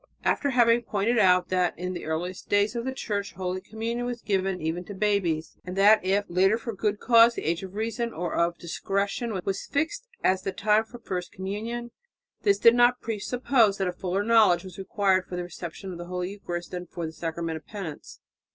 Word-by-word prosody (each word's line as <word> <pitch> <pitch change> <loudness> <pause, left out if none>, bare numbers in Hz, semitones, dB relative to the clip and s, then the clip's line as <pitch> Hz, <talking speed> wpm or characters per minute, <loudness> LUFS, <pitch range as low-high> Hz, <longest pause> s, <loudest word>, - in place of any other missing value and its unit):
After 285 - +1
having 240 -2 +4
pointed 225 +1 0
out 185 -3 +4
that 180 -2 +1
in 180 +2 -3
the 175 - -6
earliest 170 +4 -4
days 205 +2 +2
of 235 0 -3
the 265 - -1
Church 205 -6 -3
holy 185 0 -3
communion 230 +4 -3
was 245 -1 -5
given 190 -2 0
even 160 +3 -2
to 200 - -8
babies, 190 -6 0
and 180 0 -6
that 205 +1 +6
if 195 +2 +1
later 190 +5 +3
for 230 0 -5
good 205 +1 -1
cause 235 0 +6
the - - -4
age 165 +2 0
of 190 0 -9
reason 230 +2 -2
or 175 -2 -4
of 170 0 +1
discretion 200 +5 -2
was 195 0 -2
fixed 325 - -2 0.2
as 185 0 +3
the 195 - -2
time 215 +2 +2
for 240 +2 -11
first 180 -6 -5
communion, 225 +5 -5 0.5
this 200 -1 +3
did 230 +3 +7
not 245 +1 +4
presuppose 225 0 +1
that 195 - 0
a 180 - -2
fuller 190 +2 -2
knowledge 220 -6 +5
was 185 0 -10
required 190 -1 +1
for 180 - -6
the 180 - -2
reception 175 +2 -7
of 175 - -8
the 175 - -6
holy 180 +1 -3
Eucharist 175 -4 -6
than 180 -1 -5
for 170 - -5
the 160 - -5
sacrament 165 0 -3
of 155 - -14
penance. 190 -8 -8
195 Hz, 205 wpm, -26 LUFS, 180-225 Hz, 0.5 s, did